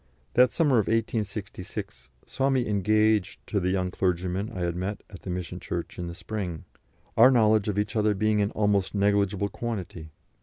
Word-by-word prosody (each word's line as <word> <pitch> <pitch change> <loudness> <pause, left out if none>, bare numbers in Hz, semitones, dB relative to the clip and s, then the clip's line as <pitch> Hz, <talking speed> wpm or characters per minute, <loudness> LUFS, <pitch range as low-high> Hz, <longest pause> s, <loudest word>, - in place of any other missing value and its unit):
That 125 -1 +5
summer 145 -8 +3
of 105 - 0
1866 100 - -3 0.2
saw 135 +1 0
me 130 -3 +1
engaged 105 -1 +2
to 105 - -1
the 90 -1 0
young 95 -1 0
clergyman 90 +3 -1
I 95 - -5
had 85 -1 -1
met 95 +3 -4
at 95 - -11
the - - -7
mission 90 -1 -4
church - - -5
in 90 - -3
the 85 - -7
spring, 90 -2 -5 0.5
our 120 +3 +8
knowledge 110 -4 +4
of 105 -1 -1
each 105 +2 -1
other 105 -1 +2
being 105 +1 +2
an 100 - +1
almost 105 -2 +1
negligeable 100 0 +1
quantity. 95 -10 -5
100 Hz, 180 wpm, -27 LUFS, 90-110 Hz, 0.5 s, our